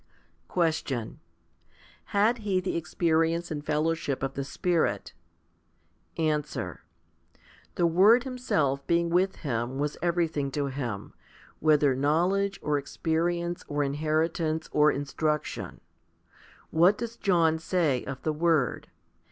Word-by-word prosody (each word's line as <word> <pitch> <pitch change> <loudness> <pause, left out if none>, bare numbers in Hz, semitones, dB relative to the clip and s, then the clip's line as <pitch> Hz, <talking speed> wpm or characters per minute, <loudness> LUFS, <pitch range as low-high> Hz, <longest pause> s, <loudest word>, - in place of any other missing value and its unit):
7. - - -39
Question. 155 -9 -1 0.9
Had 215 +4 +2
he 200 -4 0
the 185 - -3
experience 165 0 0
and 150 -2 -4
fellowship 155 -2 -1
of 135 0 -2
the 140 - -3
Spirit? 155 - -1 1.0
Answer. 155 -3 -2 0.9
The 175 - +2
Word 200 +9 +5
Himself 155 - -1
being 170 0 +2
with 185 +2 +2
him 120 -3 -3
was 145 +1 -2
every 175 -1 +1
thing 145 -3 -3
to 145 -1 0
him, 125 -7 -4 0.5
whether 150 -3 +4
knowledge, 175 +9 +1
or 150 -1 +1
experience, 170 +4 -2
or 145 0 0
inheri 155 +3 0
tance, 160 -2 -2
or 150 0 +5
instruction. 150 +2 -3 0.9
What 175 +6 +4
does 235 0 -5
John 170 -7 +2
say 160 -7 0
of 135 -1 -6
the 155 - 0
Word? 155 -4 +1
160 Hz, 120 wpm, -28 LUFS, 145-175 Hz, 1.0 s, Word